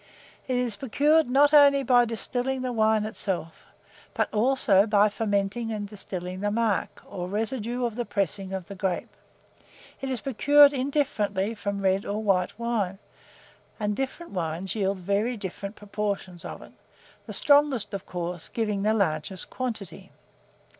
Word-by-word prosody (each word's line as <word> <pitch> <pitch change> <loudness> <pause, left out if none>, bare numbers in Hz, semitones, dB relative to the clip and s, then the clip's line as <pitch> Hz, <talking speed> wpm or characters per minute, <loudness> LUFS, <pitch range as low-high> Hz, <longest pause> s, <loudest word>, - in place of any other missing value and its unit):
It 255 -1 0
is 240 -4 0
procured 295 +4 +2
not 285 +3 +4
only 280 -2 +7
by 245 -2 +5
distilling 250 +3 -2
the 250 -1 -2
wine 220 -1 +2
itself, 190 -6 -3 0.5
but - - 0
also 220 -3 +3
by 210 0 +4
fermenting 210 +2 -1
and 210 -2 -3
distilling 185 -3 -6
the 205 +1 0
marc, 215 -1 -1
or 180 -1 -6
residue 225 +4 -2
of 235 - -2
the 240 - -1
pressings 195 -2 -2
of 190 -2 -4
the 200 - -7
grape. 190 -2 -3 0.9
It 270 - -3
is 255 -4 -3
procured 285 +3 +5
indifferently 230 -7 0
from 200 -2 -4
red 190 +1 +2
or 210 +2 -3
white 190 -3 +1
wine, 225 -5 -1 0.8
and 210 -1 -1
different 270 +7 -4
wines 175 0 -3
yield 195 -2 0
very 200 +6 -1
different 200 +1 -6
proportions 200 -4 -4
of - - -7
it, - - -15 0.6
the - - -6
strongest, 285 -7 +3
of 200 -1 -5
course, 175 -1 -4
giving 210 -3 -1
the 215 +2 +2
largest 185 -2 -1
quantity. 220 -9 -5
210 Hz, 150 wpm, -26 LUFS, 195-245 Hz, 0.9 s, only